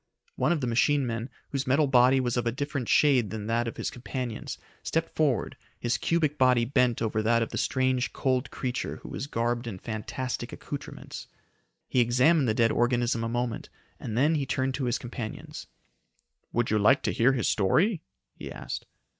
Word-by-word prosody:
One - - +1
of 165 -4 +1
the - - 0
machine 135 +4 +2
men, 115 +1 -3 0.2
whose 135 -1 -2
metal 140 +4 +4
body 130 0 +5
was 125 -2 0
of 120 -1 0
a - - +2
different 140 -1 -3
shade 130 -8 +4
than 110 -2 -5
that 115 +1 0
of 115 - -5
his - - -2
companions, 125 -2 -5 0.2
stepped 165 0 -2
forward, 145 -6 +1 0.2
his 120 -2 0
cubic 155 -1 +1
body 125 -2 +4
bent 125 -2 +2
over 110 -1 0
that 115 +1 +3
of - - -5
the - - -3
strange, 130 -1 +1
cold 130 0 0
creature 125 -1 -3
who - - -8
was 135 - -5
garbed 120 -1 -1
in 105 -5 -5
fantastic 115 +5 -4
accoutrements. - - -7 0.6
He 130 - +1
examined 125 +5 +4
the 110 - +1
dead 115 -1 +3
organism 120 -1 +1
a 115 - -1
moment, 120 -1 -2 0.3
and 110 - -4
then 145 +6 +4
he 145 -4 -1
turned 130 0 0
to 135 0 -2
his 120 0 +1
companions. 120 -2 -7 0.8
"Would 120 -1 0
you 110 - +3
like 130 +8 +4
to - - 0
hear 125 +2 +4
his 125 - 0
story?" 165 - +2 0.3
he - - -8
asked. - - -6
125 Hz, 190 wpm, -28 LUFS, 115-135 Hz, 0.8 s, body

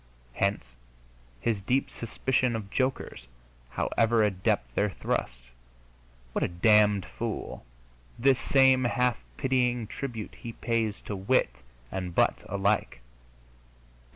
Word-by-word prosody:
Hence 80 -11 -1 0.6
his 105 - -1
deep 130 +7 0
suspicion 125 +1 -1
of 105 -3 -6
jokers, 130 - -2 0.4
however 115 - +2
adept 90 - 0
their 105 +10 +1
thrusts. - - -3 0.8
"What - - -1
a - - +2
damned 105 +1 +4
fool!" 115 - -5 0.5
this 130 +2 +3
same 130 -2 +4
half 125 -1 +1 0.2
pitying 125 -3 +1
tribute 115 -2 -6
he 115 - -8
pays 115 -3 -1
to 105 - -5
wit 95 - +1 0.3
and 90 -2 -4
butt - - +2
alike. 100 - 0
110 Hz, 110 wpm, -28 LUFS, 95-125 Hz, 0.8 s, damned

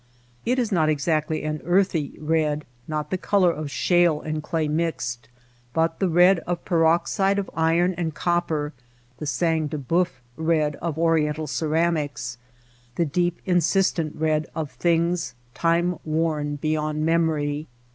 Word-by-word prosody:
It 250 +2 +2
is 240 -4 0
not 160 -5 +3
exactly 155 +1 0
an 155 0 -3
earthy 175 -4 +1
red, 150 -1 0 0.2
not 150 -1 -3
the 185 - -1
color 185 -3 +3
of 155 -2 -5
shale 170 +2 +3
and 155 0 -3
clay 155 0 -1
mixed; 150 -7 -2 0.4
but 165 0 +1
the 190 - +1
red 175 +2 +5
of 175 -1 -3
peroxide 175 +3 +2
of 200 - -3
iron 165 +3 +2
and 170 -2 -2
copper, 160 -3 -1 0.5
the 150 - -4
sang 160 +3 +1
du 150 - -4
hceuf 165 +6 +1 0.3
red 160 -2 +1
of 165 -3 -3
oriental 160 -2 +1
ceramics, 150 -5 -1 0.6
the 170 - +1
deep 175 +3 -1
insistent 175 -2 +1
red 155 0 0
of 155 -3 -3
things 170 +4 0 0.2
time 170 +1 +1
worn 155 -2 -1
beyond 155 +1 -1
memory. 155 -2 +1
160 Hz, 140 wpm, -24 LUFS, 150-175 Hz, 0.6 s, red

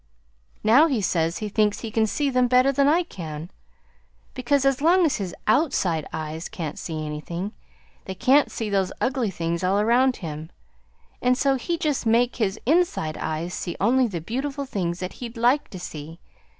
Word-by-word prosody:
Now 250 +9 +6
he 265 -7 0
says 165 -4 0
he 215 - -4
thinks 210 0 +1
he 225 - -5
can 220 0 +2
see 285 +5 0
them 250 -1 +3
better 255 +2 +4
than 275 +1 +2
I 330 +5 +4
can, 165 - -8 0.8
because 275 +2 +1
as 275 -1 +2
long 350 +3 +5
as 300 - +1
his 190 -5 -5
OUTSIDE 215 - +1
eyes 160 +2 -5
can't 155 -4 -5
see 155 -2 -4
anything, 170 +6 -5 0.5
they 190 - -5
can't 265 +7 +4
see 225 - -3
those 195 -2 0
ugly 255 -4 0
things 170 -1 -3
all 190 +2 +2
around 245 +4 +3
him, 155 -2 -7 0.7
and 250 0 +3
so 275 0 +2
he 335 +6 -2
can - - -7
just 260 -4 -3
make 235 +2 +2
his 210 -3 -1
INSIDE 305 - +1
eyes 165 +3 -3
see 175 - -4
only 255 +1 +3
the 175 -6 -5
beautiful 275 - -3
things 180 -7 -3
that 185 - -4
he'd 235 -1 -6
LIKE 245 +5 +2
to 185 - -8
see. 160 -1 -8
220 Hz, 185 wpm, -24 LUFS, 170-265 Hz, 0.8 s, Now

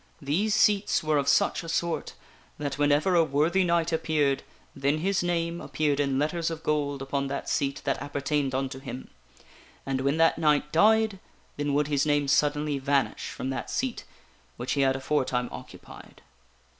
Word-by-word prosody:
These 175 +9 0
seats 205 -4 +3
were 155 -1 +2
of 140 - -2
such 140 - +2
a 165 - -7
sort, 170 0 -2 0.4
that 145 -1 -4
whenever 145 +5 +3
a 170 -2 +5
worthy 160 +6 +2
knight 170 -1 +1
appeared, 150 -4 +1 0.3
then 140 +2 +1
his 190 +4 0
name 170 -1 -1
appeared 145 +1 -1
in 140 -2 +1
letters 160 +3 0
of 165 -1 -6
gold 145 -3 -1
upon 140 0 -2
that 140 +1 -4
seat 140 0 -1
that 135 - -1
appertained 145 -1 -1
unto 135 0 -3
him; 130 -1 -8 0.7
and 135 -1 -1
when 140 +3 +1
that 165 0 +3
knight 150 -2 +2
died, 215 +3 +3 0.4
then 145 -1 -1
would 145 +1 +2
his 145 -2 +1
name 145 -1 +2
suddenly 145 0 +1
vanish 140 0 0
from 130 - -4
that 135 - -4
seat 255 -2 -2 0.5
which 125 +2 -4
he 140 - +1
had 135 -1 +3
aforetime 130 -3 -1
occupied. - - -12
145 Hz, 170 wpm, -27 LUFS, 140-165 Hz, 0.7 s, a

